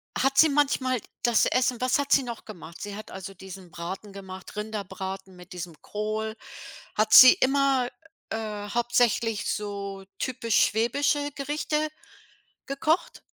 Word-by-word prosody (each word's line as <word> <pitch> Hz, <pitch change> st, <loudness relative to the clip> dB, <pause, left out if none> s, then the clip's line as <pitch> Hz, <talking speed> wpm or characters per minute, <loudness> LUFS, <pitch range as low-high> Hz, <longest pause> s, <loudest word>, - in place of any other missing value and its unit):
hat 270 Hz, 0 st, +1 dB
sie 315 Hz, -, +7 dB
manchmal 270 Hz, -3 st, +1 dB, 0.2 s
das 240 Hz, -2 st, +4 dB
Essen 250 Hz, -1 st, +1 dB
was 255 Hz, +2 st, +2 dB
hat 280 Hz, -, -2 dB
sie 275 Hz, -, +5 dB
noch 235 Hz, -2 st, -7 dB
gemacht? 170 Hz, -5 st, -11 dB
Sie 205 Hz, -1 st, -5 dB
hat 215 Hz, -, -9 dB
also 190 Hz, +1 st, -7 dB
diesen 190 Hz, -1 st, -11 dB
Braten 190 Hz, +4 st, -7 dB
gemacht, 190 Hz, 0 st, -10 dB
Rinderbraten 195 Hz, -3 st, -5 dB
mit 180 Hz, +1 st, -13 dB
diesem 170 Hz, -3 st, -7 dB
Kohl. 215 Hz, +1 st, -3 dB, 0.6 s
Hat 215 Hz, 0 st, +2 dB
sie 255 Hz, 0 st, +11 dB
immer, 270 Hz, -2 st, +2 dB, 0.4 s
äh, 210 Hz, -2 st, -4 dB
hauptsächlich 235 Hz, -1 st, +1 dB
so 200 Hz, -2 st, -5 dB
typisch 235 Hz, -4 st, -1 dB
schwäbische 285 Hz, +6 st, 0 dB
Gerichte 300 Hz, +2 st, -1 dB, 0.8 s
gekocht? 305 Hz, +5 st, -1 dB
220 Hz, 135 wpm, -26 LUFS, 195-260 Hz, 0.8 s, sie